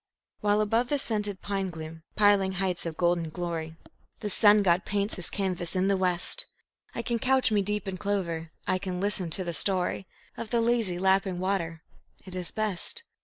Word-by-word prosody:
While 205 0 +2
above 225 +3 +1
the 290 - +1
scented 210 -6 -3
pine 195 -2 -2
gloom, 160 -1 -8
piling 205 -2 +4
heights 180 -2 -1
of 160 -1 -6
golden 170 -2 +1
glory, 165 -1 -4 0.5
The 210 -2 -3
sun 210 +1 +6
god 180 -1 +3
paints 200 +1 -1
his 180 - +1
canvas 185 -3 -1
in 185 +1 +2
the 200 - +3
west, 185 - +2 0.5
I 235 - -3
can 235 0 -1
couch 260 0 +3
me 210 -1 +3
deep 210 +1 -2
in 185 -1 -4
clover, 170 -5 -2
I 185 0 0
can 185 -2 -4
listen 195 -3 -1
to 185 +4 +1
the 170 -1 -4
story 185 +1 +2 0.3
Of 230 - -6
the 235 - +1
lazy, 230 -6 +1
lapping 190 0 +2
water 170 -4 -2 0.4
it 185 -1 -9
is 180 -2 -4
best. 215 - 0
190 Hz, 185 wpm, -28 LUFS, 175-210 Hz, 0.5 s, sun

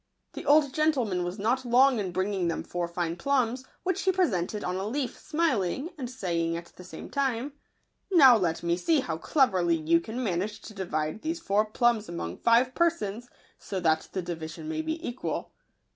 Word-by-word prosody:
The - - -8
old 290 -2 +5
gentleman 255 - +1
was 175 +3 -4
not 235 +6 0
long 250 +1 +4
in 190 -3 -2
bringing 185 0 -1
them 165 - -2
four 175 -1 -3
fine 170 -1 -2
plums, 260 -2 0 0.2
which 380 +1 0
he 380 - +3
presented 210 - 0
on 180 - -2
a 195 +2 -3
leaf, 260 +3 -2
smiling, 295 - 0
and 260 -6 -5
saying 170 -9 -1
at 170 0 -10
the 180 - -11
same 180 - -9
time, 270 0 -1 0.3
" - - -46
Now 275 -9 +8
let 175 -7 0
me 170 0 +1
see 305 - +2
how 160 -9 -3
cleverly 185 - +2
you 165 +1 +3
can 225 +8 -5
man 180 -6 0
age 210 +2 -4
to 215 - -10
divide 165 -2 -3
these 330 +2 -2
four 210 -5 +1
plums 225 -1 +1
among 90 - -5
five 240 +2 +3
persons, 245 -10 0 0.3
so 190 - -4
that 160 -2 +1
the 185 - -3
division 165 - -6
may 315 0 -2
be 320 +1 -4
equal." 240 +1 -4
215 Hz, 190 wpm, -28 LUFS, 175-270 Hz, 0.3 s, Now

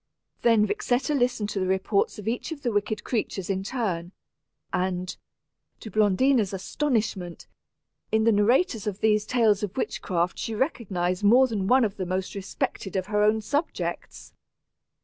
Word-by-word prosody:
Then 230 -3 +4
Vixetta 250 +6 0
listened 245 -6 +1
to 200 - -2
the 185 - 0
reports 190 +2 +1
of 210 0 -8
each 240 +7 -2
of 295 -3 -7
the 240 - 0
wicked 210 +1 -1
creatures 205 -5 -2
in 190 -1 -1
turn; 195 -7 -3 0.6
and, 180 0 -1 0.6
to 220 - -9
Blondina's 215 +1 +3
astonishment, 200 - -2 0.7
in 220 0 +3
the 230 - +5
narrators 225 - +2
of 205 -1 -3
these 210 -1 +2
tales 225 -5 +3
of 205 +1 -4
witchcraft 180 -7 -1
she 225 - -3
recognized 195 - -1
more 245 +6 +6
than 210 -6 -2
one 255 +1 +5
of 205 -1 -4
the 185 -2 -3
most 185 +1 -2
respected 200 0 -4
of 185 -1 0
her 210 - +3
own 215 +1 +3
subjects. 290 +9 -3
210 Hz, 155 wpm, -26 LUFS, 190-240 Hz, 0.7 s, more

